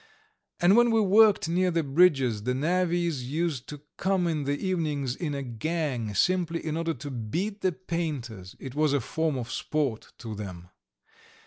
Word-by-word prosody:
And 180 +3 +5
when 240 0 +5
we 225 -1 +3
worked 210 -1 +5
near 180 +2 +2
the 165 -2 0
bridges 135 -7 +3
the 125 +4 -1
navvies 170 -1 0
used 155 -4 -2
to 150 -1 -8 0.2
come 190 -1 +1
in 155 -4 -1
the 145 +1 0
evenings 150 -9 -1
in 150 -5 -3
a 140 - -3
gang, 125 -3 -2
simply 170 - +1
in 155 -1 -2
order 165 0 -1
to 140 +3 -7
beat 170 - -3
the 185 - +2
painters 145 - -5
it 135 -2 -7
was 150 0 +2
a 145 - +3
form 160 +3 -1
of 120 -2 -5
sport 140 -8 -2
to 115 -2 -7
them. 90 -4 -8
155 Hz, 175 wpm, -27 LUFS, 130-175 Hz, 0.2 s, And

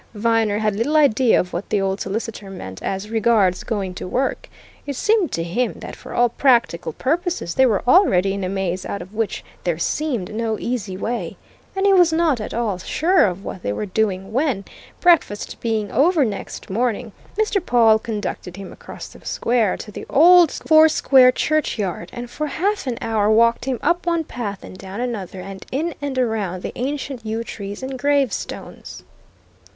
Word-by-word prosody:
Viner 225 -1 +1
had 215 -1 0
little 235 +9 0
idea 260 -5 +4
of 180 - -3
what 175 +4 -4
the 210 - +1
old 195 0 -1
solicitor 210 0 -4
meant 95 - -8
as 195 +3 -4
regards 220 -5 +2
going 200 -5 -3
to 180 - -6
work; 260 +8 -2 0.4
it 280 - -3
seemed 425 - +2
to 165 - -1
him 235 +9 -1
that - - -8
for - - -10
all 245 - +4
practical 235 -9 +2
purposes 335 - -1
they 260 +6 +4
were 215 -5 +1
already 195 - +4
in 200 -1 -4
a 185 - -2
maze 185 -2 -2
out 200 - -4
of 190 - -16
which 220 -1 -2 0.2
there 175 -3 0
seemed 235 - -2
no 220 0 -1
easy 210 -6 -3
way. 235 +5 -3 0.4
And 385 +1 0
he 400 - +5
was 355 -3 +5
not 320 -7 +2
at - - -5
all 220 -5 -1
sure 335 - +2
of 185 +1 -5
what 185 - -6
they 100 - -2
were 105 - -3
doing 195 -1 -1
when, 255 -7 0 0.3
breakfast 335 - +2
being 220 -3 -1
over 310 0 +3
next 205 -3 -6
morning, 230 +1 -1 0.3
Mr. 425 -3 +1
Pawle 230 -6 +4
conducted 205 -5 -5
him 195 -1 -8
across - - -10
the - - -16
square 230 -5 0
to 210 - -9
the - - -8
old 345 +3 +7
four 315 +2 +5
square 260 -4 +5
churchyard, 245 - -1
and 245 0 -6
for 300 +5 -4
half 385 +4 -1
an 240 -2 -2
hour 215 -2 +1
walked 230 +2 +3
him 265 -2 -1
up 345 +1 +1
one 335 -1 +1
path 210 - -6
and 185 - -11
down 195 +2 -7
another 210 -7 -4
and 190 0 -8
in 315 +5 -1
and 280 -2 -3
around 215 -7 -1
the - - -4
ancient 270 -1 -4
yew 220 +1 -3
trees 205 0 -7
and 260 0 -5
gravestones. 280 -3 -2
230 Hz, 185 wpm, -21 LUFS, 195-280 Hz, 0.4 s, old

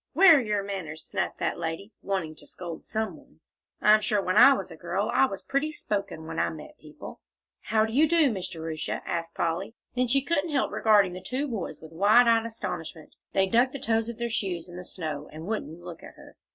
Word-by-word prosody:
"Where 365 -5 +8
are - - +2
your 210 -3 -1
manners?" 175 -6 -6
snapped - - -3
that - - -2
lady, 165 +5 -4
wanting 185 -6 -2
to - - -14
scold 170 -3 -8
some 220 0 -2
one. - - -21 0.4
"I'm 215 0 +6
sure 210 0 +1
when 185 -1 -1
I 250 +5 +9
was - - -4
a - - -8
girl - - -2
I - - +5
was - - -7
pretty 280 +3 -1
spoken, 200 - -4
when 160 - -4
I 85 0 +2
met 80 - -10
people." - - -11 0.4
"How 220 +1 +2
do 220 - -6
you 300 +4 +4
do, 320 -5 +4
Miss 190 -4 -3
Jerusha?" 160 -1 -4
asked 165 -1 -3
Polly. 180 +7 -2 0.2
Then 250 0 +2
she 270 +3 +2
couldn't 335 +1 0
help 285 -3 0
regarding 205 -4 +4
the 185 - -7
two 270 +7 -2
boys 225 -8 -5
with 160 0 -12
wide 210 +8 +5
eyed 230 0 +4
astonishment; 165 -8 -6 0.2
they 195 - +3
dug 240 +6 +2
the 275 - -5
toes 225 -1 0
of 235 - -6
their 235 0 -2
shoes 185 -6 -2
in 175 - -11
the 180 - -7
snow, 155 -5 -5
and 155 +2 -8
wouldn't 175 -5 -4
look 175 -2 -9
at - - -12
her. - - -15
205 Hz, 225 wpm, -27 LUFS, 170-235 Hz, 0.4 s, I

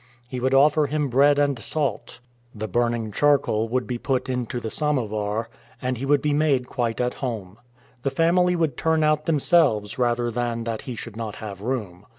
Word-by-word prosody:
He 125 0 -5
would 130 +2 +1
offer 150 +2 +5
him 150 0 -1
bread 140 +3 +4
and 140 -3 +1
salt, 145 +3 -3 0.4
the 110 +1 -4
burning 115 0 0
charcoal 120 -5 +2
would 125 +1 0
be 125 -2 -4
put 130 -1 -1
into 125 -1 -2
the 110 -2 -5
"samovar," 110 -7 -1 0.3
and 125 0 -2
he 135 - -3
would 145 +1 +3
be 150 -1 +1
made 145 -4 +2
quite 120 -3 -2
at 125 0 0
home. 110 -6 -5 0.4
The 135 - 0
family 180 +4 +3
would 160 -7 0
turn 160 -1 +2
out 150 0 +1
themselves 140 - +2
rather 120 -1 +1
than 120 0 -2
that 115 -1 -3
he 125 - -4
should 115 -1 -8
not 110 -2 -5
have 100 -3 -8
room. 105 -6 -4
125 Hz, 185 wpm, -24 LUFS, 115-145 Hz, 0.4 s, offer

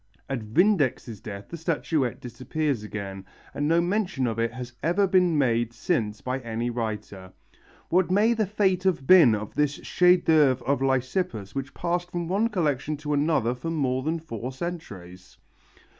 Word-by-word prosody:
At 135 -2 -2
Vindex's 130 - +1
death 100 -2 -8
the 170 - -6
statuette 150 -6 -1
disappears 135 +1 -3
again, 100 -2 -6 0.3
and 145 +1 -1
no 165 +2 +4
mention 185 -6 0
of 115 -2 -2
it 115 0 0
has 125 +1 -8
ever 175 +5 +2
been 180 -3 +3
made 120 -4 +1
since 110 - -1
by 130 +1 -2
any 120 0 -3
writer. 105 -5 -5 0.6
What 180 0 +2
may 210 +5 +4
the 220 -3 0
fate 190 -2 +1
have 180 -8 0
been 160 -11 +7
of 105 0 -6
this 150 -1 +1
chef 180 +3 +3
d'œuvre 145 -7 +3
of 140 -1 0
Lysippus 130 - -1
which 135 +1 -5
passed 175 0 -2
from 175 -1 -3
one 200 +6 +1
collection 155 - -1
to 150 0 -3
another 145 -5 +1
for 125 +6 -6
more 130 -5 0
than 160 +4 -1
four 125 -6 -6
centuries? 100 - -8
140 Hz, 165 wpm, -26 LUFS, 115-175 Hz, 0.6 s, been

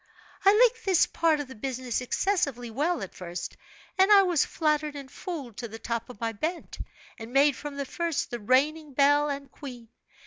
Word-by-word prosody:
"I 390 - +7
liked 475 -1 +4
this 375 -3 +4
part 325 -2 +1
of 290 - -4
the 260 - -10
business 255 +1 -3
excessively 250 - -1
well 305 - 0
at 190 - -8
first, 175 -1 -6 0.4
and 385 +2 +5
I 400 -1 +8
was 350 -5 +3
flattered 305 -2 0
and 275 -2 -8
fooled 285 - -7
to 235 - -5
the 225 0 -9
top 230 +1 -4
of 245 - -11
my 230 -1 -1
bent, 320 - -4 0.4
and 225 +1 -8
made 280 +1 +4
from 290 -1 -7
the 280 - -2
first, 335 +2 -2
the 240 - -4
reigning 285 +7 +1
belle 290 +1 +4
and 280 -1 -5
queen. 245 -6 -10
280 Hz, 195 wpm, -27 LUFS, 245-320 Hz, 0.4 s, I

